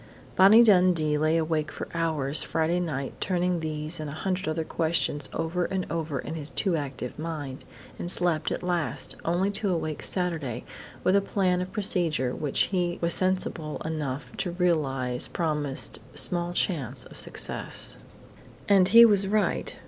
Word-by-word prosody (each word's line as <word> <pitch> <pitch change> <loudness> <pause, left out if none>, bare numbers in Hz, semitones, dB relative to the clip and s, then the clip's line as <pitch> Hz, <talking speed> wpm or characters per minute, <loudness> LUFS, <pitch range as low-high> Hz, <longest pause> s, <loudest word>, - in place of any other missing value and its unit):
Bonnie 205 +5 +7
Dundee 180 -7 +3
lay 155 +2 +2
awake 155 -1 -1
for - - -7
hours 155 -4 +5
Friday 165 +2 0
night 140 -6 -4
turning 180 -1 0
these 155 0 -4
and 155 -1 -5
a - - -7
hundred 185 +3 -3
other 160 +1 -1
questions 160 -4 -1
over 170 +2 -2
and 190 0 -3
over 160 -3 -3
in - - -5
his 155 -2 -5
too 170 +7 0
active 140 -3 -5
mind, 150 -5 -6 0.3
and 175 - -4
slept 175 -3 +1
at - - -4
last, 175 -8 -2
only 180 +4 0
to 205 0 -2
awake 155 -4 -2
Saturday 160 - -1 0.4
with 185 - +3
a 200 - +4
plan 185 -2 0
of 180 - -6
procedure 170 - 0
which 145 -3 -1
he 175 -2 0
was 170 0 +1
sensible 185 -4 0
enough 150 -3 -5
to 180 - -2
realize 140 -8 0
promised 150 -5 -2 0.2
small 170 +5 +2
chance 140 - -1
of - - -14
success. - - -2 0.7
And 195 -3 +5
he 230 +5 +8
was 200 -3 +4
right. 210 +1 -1
165 Hz, 155 wpm, -26 LUFS, 150-180 Hz, 0.7 s, he